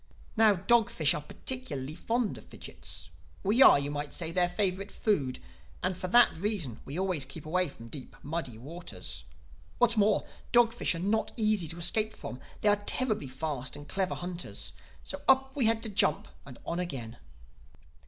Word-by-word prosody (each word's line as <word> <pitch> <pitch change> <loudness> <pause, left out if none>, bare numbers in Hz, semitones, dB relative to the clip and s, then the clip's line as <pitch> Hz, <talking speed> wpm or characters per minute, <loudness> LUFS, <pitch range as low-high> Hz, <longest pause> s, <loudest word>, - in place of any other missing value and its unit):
"Now 220 -2 +6
dog 220 +5 +3
fish 150 -3 +3
are 150 - -3
particularly 150 - -3
fond 225 +6 -1
of - - -16
fidgits. 80 0 -6 0.3
We 215 +7 +4
are, - - +10
you 140 +1 -1
might 145 0 -4
say, 165 -2 -2
their 175 0 +3
favorite 190 +1 0
food—and 180 - -2
for 185 - -4
that 240 +6 +6
reason 170 - -1
we 140 +4 -6
always 185 -6 +1
keep 150 +3 -9
away 180 +2 +1
from 115 -4 -12
deep, 130 +2 -9
muddy 145 -6 -4
waters. 165 +9 -7 0.5
What's 235 -2 +3
more, 210 0 +3 0.3
dog 240 -1 +5
fish 240 - +1
are - - -3
not 205 +6 0
easy 215 -6 +2
to 165 - -3
escape 215 +5 +2
from; 125 - -7 0.2
they 210 - +4
are 205 0 +2
terribly 215 - 0
fast 135 0 -3
and 145 0 -10
clever 190 -2 -1
hunters. 175 0 -5 0.3
So - - -6
up 265 0 +4
we 270 -5 +2
had 225 0 +1
to 225 - -1
jump 190 -7 +2 0.2
and 130 - -10
on 170 - -2
again. 125 -10 -4
180 Hz, 175 wpm, -30 LUFS, 145-215 Hz, 0.5 s, are